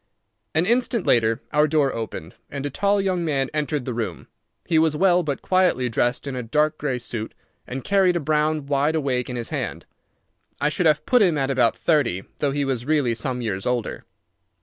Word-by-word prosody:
An 160 +2 +3
instant 235 -1 +2
later 115 +1 +2
our 150 +1 +3
door 150 -3 +2
opened, 110 -8 -6 0.2
and 140 0 -5
a 145 - -3
tall 200 +7 +1
young 185 -3 0
man 140 -5 -1
entered 150 -3 -1
the 125 - -3
room. 115 -1 -4 0.4
He 160 - +2
was 160 -1 +2
well 180 0 +4
but 145 -5 -4
quietly 180 -9 +2
dressed 120 +3 0
in 140 -2 -4
a 125 - -3
dark 150 +6 0
grey 135 -4 -1
suit, 115 -2 -5 0.3
and 130 +1 -5
carried 190 -3 +3
a - - +1
brown 155 0 0
wide 145 +2 +1
awake 130 -5 -1
in 125 - -4
his 120 -1 -4
hand. - - -4 0.7
I 145 - +2
should 165 +2 +1
have 150 -1 +2
put 250 -2 +4
him 175 -6 +3
at 135 -1 0
about 120 -4 +2
thirty, 135 - +1 0.2
though 145 - +1
he 140 +1 -1
was 130 -3 -2
really 145 -4 +1
some 125 +2 -3
years 95 -4 -3
older. 125 -2 -2
145 Hz, 200 wpm, -23 LUFS, 125-160 Hz, 0.7 s, well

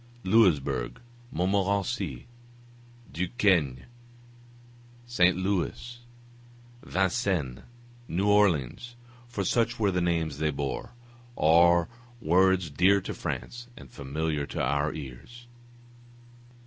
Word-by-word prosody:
Louisbourg, 75 - +2 0.3
Montmorency, 100 0 -1 0.9
Duquesne, 85 - +1 1.2
St. 90 -7 +3
Louis, 100 +5 -2 0.8
Vincennes, 95 - -1 0.5
New 95 +5 -1
Orleans 105 - +1 0.3
(for 105 -4 -3
such 115 +4 +1
were 105 -3 +1
the 90 -1 0
names 80 -4 -1
they 80 0 +1
bore) 70 - -4 0.4
are 85 +2 +5 0.3
words 95 -2 +2
dear 95 +7 +4
to 95 - -6
France 120 0 -6
and 65 -3 -13
familiar 75 +1 -3
to - - -6
our 70 +3 0
ears. 75 - -10
90 Hz, 90 wpm, -27 LUFS, 75-100 Hz, 1.2 s, are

